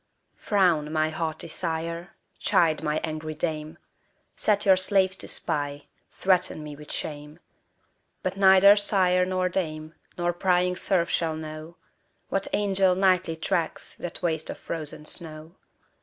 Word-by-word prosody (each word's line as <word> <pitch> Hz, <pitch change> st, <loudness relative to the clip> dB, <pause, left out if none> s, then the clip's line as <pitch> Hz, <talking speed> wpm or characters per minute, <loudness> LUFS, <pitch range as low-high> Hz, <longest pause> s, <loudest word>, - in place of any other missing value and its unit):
Frown, 175 Hz, -7 st, +1 dB
my 155 Hz, 0 st, +1 dB
haughty 160 Hz, 0 st, -3 dB
sire! 165 Hz, +1 st, -3 dB, 0.2 s
chide, 160 Hz, -3 st, +2 dB
my 150 Hz, +1 st, 0 dB
angry 155 Hz, 0 st, -4 dB
dame! 155 Hz, 0 st, -3 dB, 0.6 s
Set 205 Hz, -1 st, +1 dB
your 190 Hz, -1 st, +7 dB
slaves 190 Hz, 0 st, +2 dB
to -, -, -6 dB
spy; 145 Hz, -3 st, -3 dB, 0.3 s
threaten 180 Hz, -4 st, +1 dB
me 150 Hz, -1 st, -8 dB
with 150 Hz, +1 st, -10 dB
shame: 150 Hz, 0 st, -5 dB, 0.9 s
But 185 Hz, +1 st, -2 dB
neither 195 Hz, +1 st, +7 dB
sire 185 Hz, -3 st, +3 dB
nor 185 Hz, 0 st, 0 dB
dame, 155 Hz, -4 st, -3 dB, 0.2 s
nor 175 Hz, 0 st, 0 dB
prying 180 Hz, 0 st, +1 dB
serf 180 Hz, -2 st, 0 dB
shall 160 Hz, -2 st, 0 dB
know, 155 Hz, +1 st, -8 dB, 0.5 s
What 195 Hz, 0 st, -1 dB
angel 195 Hz, -2 st, +2 dB
nightly 185 Hz, -3 st, +2 dB
tracks 160 Hz, 0 st, -2 dB
that 175 Hz, +1 st, -7 dB
waste 160 Hz, -2 st, -1 dB
of -, -, -5 dB
frozen 155 Hz, -2 st, -6 dB
snow. 160 Hz, 0 st, -6 dB
170 Hz, 135 wpm, -26 LUFS, 155-185 Hz, 0.9 s, your